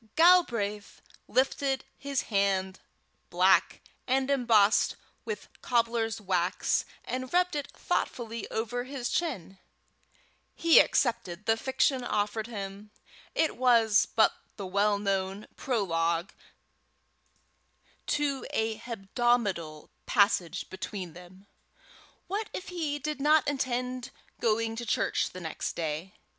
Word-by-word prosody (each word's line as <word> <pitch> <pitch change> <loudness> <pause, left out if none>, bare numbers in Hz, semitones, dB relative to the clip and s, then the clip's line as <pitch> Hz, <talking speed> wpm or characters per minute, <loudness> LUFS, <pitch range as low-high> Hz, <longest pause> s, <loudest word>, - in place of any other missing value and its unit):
Galbraith 240 - +3 0.3
lifted 270 +1 +1
his 280 -2 -2
hand, 190 -1 +1 0.5
black, - - +3 0.3
and 265 +1 +1
embossed 230 -6 +4 0.3
with 450 - -5
cobbler's 230 -2 0
wax, 185 -2 0 0.2
and 255 0 -4
rubbed 360 -1 +2
it 290 -2 -3
thoughtfully 230 -2 -3
over 240 +2 -2
his 265 -2 -4
chin: 195 - -2 1.0
he 335 -1 +6
accepted 210 -6 +1
the 225 - +3
fiction 260 +2 +1
offered 215 -1 -1
him; 200 -2 -7 0.5
it 320 - +1
was 230 -4 +4
but 220 - +5 0.2
the 200 - -6
well 200 +2 +2
known 195 0 -2
prologue 170 -7 0 1.8
to 280 -3 0
a 220 0 -1
hebdomadal 210 -7 -1 0.2
passage 200 -6 +2
between 190 -2 -6
them. 180 +2 -14 0.8
What 420 +3 -3
if 370 - -6
he 320 -5 -2
did 295 0 -4
not 300 +1 +4
intend 255 -2 -2 0.3
going 225 0 +1
to 240 - -4
church - - +1
the 185 - -9
next 160 -2 -4
day? 160 +4 -3
225 Hz, 110 wpm, -29 LUFS, 195-265 Hz, 1.8 s, he